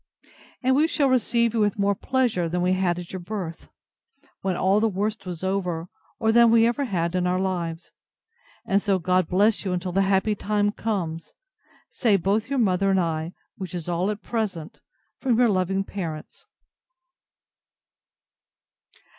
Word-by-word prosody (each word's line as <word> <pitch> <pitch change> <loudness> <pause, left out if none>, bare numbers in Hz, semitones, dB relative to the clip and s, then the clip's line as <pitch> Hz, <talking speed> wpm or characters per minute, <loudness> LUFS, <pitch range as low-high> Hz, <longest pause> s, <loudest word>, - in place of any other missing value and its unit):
And 260 +1 +3
we 305 +3 +4
shall 285 -4 +1
receive 235 -2 +2
you 230 - 0
with 210 +1 +1
more 200 0 +2
pleasure 225 -5 0
than 180 +1 -1
we 180 +1 +2
had 185 -2 +1
at 175 0 -8
your 185 - -4
birth, 175 -3 -6 0.7
when 185 -2 -1
all 195 +2 +3
the 225 +1 +2
worst 205 +1 -3
was 175 -1 -6
over; 180 -3 -2 0.3
or 220 - +2
than 235 0 +6
we 230 0 +5
ever 240 +4 0
had 170 -6 -1
in 180 -1 0
our 180 +1 +1
lives. 175 -3 -3 0.7
And 195 +1 +2
so 195 -2 +1
God 185 0 +1
bless 205 +4 +2
you 185 -2 -1
till 180 +1 -4
the 195 +2 +2
happy 195 +2 +2
time 205 0 0
comes! 180 -8 -4 0.6
say 220 -5 +2
both 205 +6 0
your 280 - -1
mother 195 -4 +2
and 190 -1 +3
I, 165 0 -2 0.2
which 185 -3 -6
is 175 -2 -5
all 175 +3 0
at 210 0 -4
present, 195 -9 -4 0.4
from 260 -3 +1
Your 245 - +5
truly 230 - +3
loving 190 +1 0
PARENTS. 165 -6 -7
195 Hz, 170 wpm, -24 LUFS, 180-220 Hz, 0.7 s, than